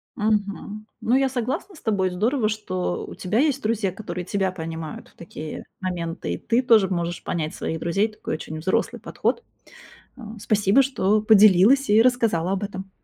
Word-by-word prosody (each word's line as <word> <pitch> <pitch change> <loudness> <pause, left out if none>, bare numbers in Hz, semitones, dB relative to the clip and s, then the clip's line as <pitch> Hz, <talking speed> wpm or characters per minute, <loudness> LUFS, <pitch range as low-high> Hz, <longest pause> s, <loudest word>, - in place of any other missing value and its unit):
Мгм. 210 -1 -2
Ну, 240 - +2
я 270 0 +3
согласна 260 - -3
с - - -15
тобой. 195 -4 +1
Здорово, 215 +6 0
что 185 -4 -3
у - - -10
тебя 195 +5 -1
есть 280 -1 +2
друзья, 215 -3 0
которые 180 -2 -6
тебя 190 0 0
понимают 160 -3 -7
в - - -28
такие 155 -2 -8 0.2
моменты, 170 - -3
и - - -3
ты 235 +3 +1
тоже 225 -6 +5
можешь 175 -2 -3
понять 155 -3 -3
своих 160 - -4
друзей. 195 +7 +1
Такой 210 -6 -5
очень 155 0 -7
взрослый 185 +4 -1
подход. 475 - -2 0.7
А, 225 -3 -10
спасибо, 210 +4 +3
что 215 -6 +1
поделилась 215 +5 +5
и 215 +2 +6
рассказала 230 -8 +1
об 195 +1 -2
этом. 195 -1 -7
205 Hz, 170 wpm, -23 LUFS, 180-225 Hz, 0.7 s, и